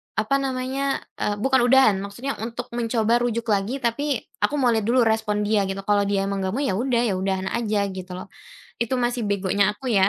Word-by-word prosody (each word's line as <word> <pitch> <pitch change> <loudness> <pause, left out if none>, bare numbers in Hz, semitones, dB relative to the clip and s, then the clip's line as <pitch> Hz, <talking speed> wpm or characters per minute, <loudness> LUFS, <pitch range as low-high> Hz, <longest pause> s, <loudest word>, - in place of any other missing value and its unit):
apa 220 +5 +1
namanya, 270 +1 -2 0.2
eee, 205 - 0
bukan 265 -1 +4
udahan, 255 -5 +6
maksudnya 220 +8 -5
untuk 235 +2 -5
mencoba 230 -1 +2
rujuk 235 -1 -1
lagi 210 +7 0
tapi 270 +3 0 0.2
aku - - +2
mau 250 - +4
lihat 220 -2 0
dulu 250 +2 +4
respon 220 -2 +1
dia 205 -1 +2
gitu, 195 0 -4
kalau 205 -1 +3
dia 200 -1 +1
emang 200 0 -2
nggak 190 0 -2
mau 275 - -1
ya 220 -9 0
udah, 240 0 +1
ya - - 0
udahan 190 0 -1
aja 215 -3 0
gitu 185 -1 -8
loh. 185 - -8 0.5
Itu 235 +3 -1
masih 240 -1 0
begonya 200 0 +2
aku 265 - -10
ya. 195 -2 +4
225 Hz, 210 wpm, -23 LUFS, 200-250 Hz, 0.5 s, udahan